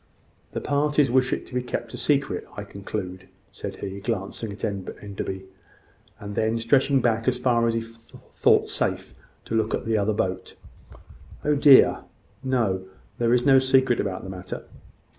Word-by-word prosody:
"The - - -3
parties 145 -1 +2
wish 125 0 +3
it - - -2
to - - -12
be 125 - 0
kept 120 -2 -5
a - - -5
secret, 140 -2 0
I 100 - -4
conclude," 95 -2 -6 0.2
said - - -6
he, 100 0 -6
glancing 105 0 -3
at 100 - -10
Enderby, 100 -1 -5 0.8
and 100 0 -7
then 110 +2 +1
stretching 135 +3 +3
back 115 -1 +1
as 125 -1 +2
far 120 -2 +2
as 115 - +1
he 115 - 0
thought 115 0 0
safe, - - -2 0.3
to - - -6
look 110 -1 +1
at - - -6
the 110 -1 +1
other 105 +1 +1
boat. 95 -2 -3 0.9
"Oh 150 - +3
dear, 140 -2 +7 0.4
no! 110 -8 0 0.3
There 120 -1 +2
is 125 0 +3
no 135 -1 +7
secret 130 -2 +3
about 95 -2 -2
the 95 - -7
matter." 90 -1 -7
115 Hz, 165 wpm, -25 LUFS, 100-130 Hz, 0.9 s, dear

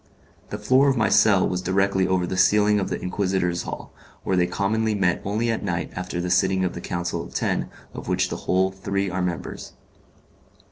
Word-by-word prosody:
The 105 - -4
floor 130 +7 +3
of 135 - +1
my 110 - +2
cell 100 -4 +4
was 90 0 -2
directly 95 +1 +1
over 95 -1 +1
the 95 - -3
ceiling 105 +2 +4
of 95 - -2
the - - -3
Inquisitors' 90 -2 -1
hall, - - -7 0.3
where 95 - 0
they 90 -1 +2
commonly 110 +4 0
met 90 -3 +1
only 110 +4 0
at 115 - -3
night 85 -4 -2
after 90 -1 -4
the 90 0 -2
sitting 95 +1 +2
of 90 - -2
the 85 - -7
Council 90 0 -3
of - - -12
Ten - - -1 0.2
of - - -8
which - - +1
the - - -4
whole 95 +1 +3
three 100 0 -2
are 90 +1 -2
members. 90 -2 -4
95 Hz, 200 wpm, -24 LUFS, 90-105 Hz, 0.3 s, cell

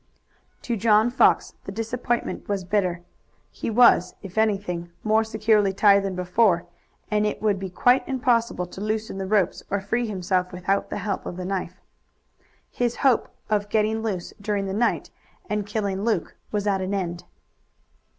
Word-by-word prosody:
To 240 - -1
John 220 +2 +3
Fox 255 - +3
the - - -5
disappointment 230 +3 -3
was 200 -2 -1
bitter. 180 -2 0 0.5
He - - -4
was, 225 -6 +5
if 190 -2 -9
anything, 195 -6 0
more 220 +1 +3
securely 215 -2 +2
tied 200 0 +5
than 195 -1 -3
before, 180 0 +2 0.5
and 210 0 +2
it 210 - -1
would 210 -3 +1
be 190 -1 -5
quite 245 +8 +3
impossible 240 -7 +1
to 180 +2 -10
loosen 215 -1 -2
the 190 - -3
rope 200 -3 +2 0.2
or 200 - 0
free 235 +5 -1
himself 185 -2 -1
without 185 +2 -1
the - - -3
help 200 -3 -3
of 180 - -6
the 180 - -5
knife. 185 -1 -3 0.9
His 240 -1 -1
hope 255 -4 +3 0.2
of 205 -1 0
getting 220 +1 +1
loose 195 -6 -3
during 205 -1 -1
the 190 - -3
night 235 +4 0 0.4
and 210 -1 -2
killing 205 -2 -2
Luke 215 -7 -1 0.2
was 210 -1 -1
at 195 -2 +1
an 190 +2 -2
end. 175 -3 -3
205 Hz, 165 wpm, -24 LUFS, 190-220 Hz, 0.9 s, was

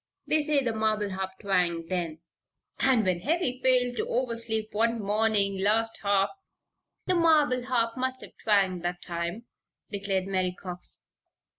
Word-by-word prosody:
They 310 - +2
say 295 -2 +1
the 235 -3 0
marble 215 -2 0
harp 190 0 -3
twanged 175 -5 0
then." 170 -3 -3 0.6
"And 250 -6 +4
when 180 -2 +1
Heavy 270 - -1
failed 250 -1 +2
to - - -1
oversleep 230 -3 -1
one 230 +2 +1
morning 205 -1 +1
last 225 +3 +1
half 200 -1 +2 0.8
the 370 - +1
marble 300 -7 +3
harp 230 -3 +1
must 260 0 -2
have - - -12
twanged 195 -4 +2
that 175 0 -3
time," 170 +6 -4 0.5
declared 195 -2 -1
Mary 185 -2 -1
Cox. 180 -1 -6
215 Hz, 145 wpm, -28 LUFS, 190-245 Hz, 0.8 s, And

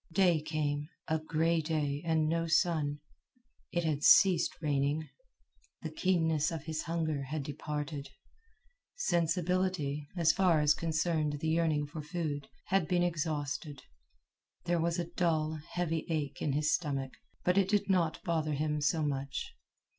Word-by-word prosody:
Day 175 -3 +4
came 150 -1 -2 0.2
a 160 0 +1
gray 160 +1 +1
day 150 -2 -1
and 160 -2 +2
no 165 +1 0
sun. 160 -3 +1 0.7
It 175 -1 0
had 150 -2 -1
ceased 180 -4 +5
raining. 145 0 0 0.8
The 160 - -4
keenness 160 -3 +1
of 165 -4 -5
his 160 -1 -3
hunger 160 -3 -1
had 150 +2 -3
departed. 150 0 -4 0.9
Sensibility, 175 - 0
as 165 -2 +5
far 180 -4 +3
as 150 0 +5
concerned 160 -2 0
the 160 - -1
yearning 160 -2 +2
for 155 +2 -7
food, 150 -3 -3 0.2
had 190 -4 +1
been 175 +1 +2
exhausted. 150 -4 -2 0.8
There 175 -1 +1
was 170 +1 0
a 175 - -1
dull, 160 -3 0
heavy 165 -2 -1
ache 145 -4 -2
in 145 - 0
his 150 +2 +2
stomach, 135 -5 -1 0.3
but 180 - +2
it 190 -1 +1
did 205 -1 +2
not 175 -5 +1
bother 160 -3 0
him 150 +1 -1
so 155 +2 +1
much. 140 -1 -3
155 Hz, 145 wpm, -32 LUFS, 150-170 Hz, 0.9 s, ceased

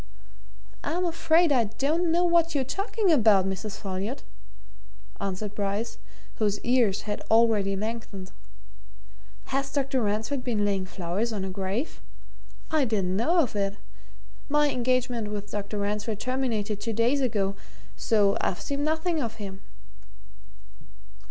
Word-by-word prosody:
"I'm 350 +5 0
afraid 335 -1 +3
I 245 -5 +4
don't 295 +11 0
know 345 +2 +3
what 335 -2 +3
you're 275 - +2
talking 395 - 0
about, 215 - +5
Mrs. 195 +2 -4
Folliot," 195 - -4 1.0
answered 200 +1 -3
Bryce, 205 +3 -2 0.4
whose 205 -2 +1
ears 240 -5 +2
had 205 -1 -3
already 220 -3 +4
lengthened. 205 -2 -5 1.2
"Has 275 0 0
Dr. 275 -2 0
Ransford 225 +5 -1
been 220 -4 0
laying 195 -2 0
flowers 185 +6 -2
on 200 -3 -2
a 190 - -4
grave? 195 - -3 0.7
I 310 -2 +3
didn't 195 -6 0
know 330 - +3
of 250 -8 -2
it. 200 0 -1 0.7
My 295 0 +3
engagement 250 -2 0
with 205 -1 -5
Dr. 205 0 -3
Ransford 210 +1 -2
terminated 225 -5 -1
two 225 +1 -2
days 240 +6 +2
ago 200 -6 0 0.4
so 205 -3 +3
I've 180 - -1
seen 280 0 -2
nothing 315 +1 0
of 230 -3 -3
him." 195 -3 -7
225 Hz, 130 wpm, -27 LUFS, 200-275 Hz, 1.2 s, about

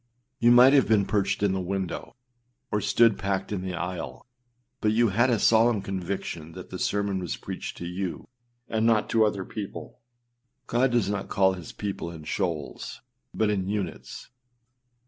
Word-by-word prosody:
â - - -48 0.4
You 120 +1 +5
might 125 +3 +8
have 140 -3 +5
been 105 -3 +3
perched 100 -1 0
in 100 - +3
the 95 0 -1
window, 95 0 -4 0.6
or 105 -1 +1
stood 115 -1 +4
packed 95 0 -2
in 100 -3 -2
the 95 -1 -4
aisle; 90 0 -5 0.5
but 105 0 +2
you 115 0 +4
had 120 +6 +3
a 120 - +3
solemn 110 -1 +4
conviction 90 -4 -4
that 90 0 -10
the 90 - -5
sermon 100 -2 0
was 90 -3 -4
preached - - -6
to 85 - -6
you, 90 +1 -4 0.4
and 110 0 0
not 110 -2 +2
to 115 -1 +4
other 100 -3 0
people. 105 -3 -7 0.7
God 125 +3 +2
does 120 -4 +1
not 100 -1 -3
call 95 -1 +3
his 90 -3 -8
people 100 -4 -4
in 80 -2 -9
shoals, 80 - -3 0.3
but 110 -1 +1
in 95 -2 -1
units. 105 -2 -5
100 Hz, 175 wpm, -26 LUFS, 95-110 Hz, 0.7 s, might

